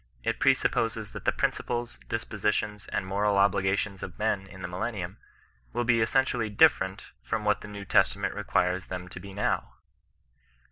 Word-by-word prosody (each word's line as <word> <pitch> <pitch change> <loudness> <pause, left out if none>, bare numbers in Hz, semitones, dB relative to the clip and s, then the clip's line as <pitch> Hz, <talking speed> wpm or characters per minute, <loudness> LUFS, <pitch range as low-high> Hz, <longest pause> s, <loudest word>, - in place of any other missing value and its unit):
It - - -1
presupposes 110 -2 +2
that - - -8
the - - +4
principles, 120 0 -2
dispositions, 105 -1 -1
and - - -2
moral 100 +1 +1
obligations 100 0 +2
of 90 - -7
men 105 -2 0
in 95 -1 -11
the - - -2
millennium, 95 +1 -4 0.6
will 120 - 0
be 115 -1 +3
essentially 120 -1 +2
different 95 -1 +3
from 110 -1 -2
what 105 0 +2
the - - -8
New 100 -1 -7
Testament - - +2
requires 90 +1 0
them 90 -1 -5
to 90 - -8
be 100 +2 -9
now. 100 +2 -1
100 Hz, 155 wpm, -28 LUFS, 95-110 Hz, 0.6 s, the